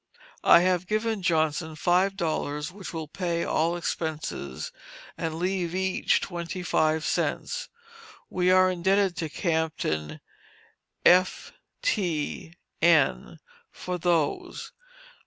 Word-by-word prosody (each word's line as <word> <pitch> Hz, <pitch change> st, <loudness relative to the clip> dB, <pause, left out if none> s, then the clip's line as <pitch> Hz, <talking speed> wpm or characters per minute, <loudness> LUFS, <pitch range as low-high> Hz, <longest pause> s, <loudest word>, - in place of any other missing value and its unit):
I -, -, +7 dB
have 180 Hz, 0 st, +1 dB
given 215 Hz, -1 st, -1 dB
Johnson 160 Hz, -1 st, 0 dB
five 180 Hz, +5 st, +2 dB
dollars, 150 Hz, -3 st, -2 dB
which 195 Hz, 0 st, -8 dB
will 160 Hz, -2 st, -5 dB
pay 170 Hz, +1 st, -2 dB
all 165 Hz, +2 st, +1 dB
expenses, 155 Hz, -, -4 dB, 0.4 s
and 160 Hz, -1 st, -3 dB
leave 180 Hz, 0 st, -1 dB
each 190 Hz, 0 st, +1 dB
twenty 175 Hz, +1 st, -5 dB
five 155 Hz, -2 st, +1 dB
cents. -, -, -2 dB, 0.6 s
We 180 Hz, 0 st, +1 dB
are 185 Hz, 0 st, +5 dB
indebted 190 Hz, +1 st, +2 dB
to 160 Hz, -2 st, -3 dB
Captain 160 Hz, -, -2 dB, 0.9 s
F 185 Hz, +1 st, +4 dB, 0.3 s
t 170 Hz, -, -1 dB, 0.3 s
n 150 Hz, -, +3 dB, 0.3 s
for 180 Hz, -1 st, -5 dB
those. 165 Hz, -4 st, -1 dB
175 Hz, 105 wpm, -27 LUFS, 160-185 Hz, 0.9 s, I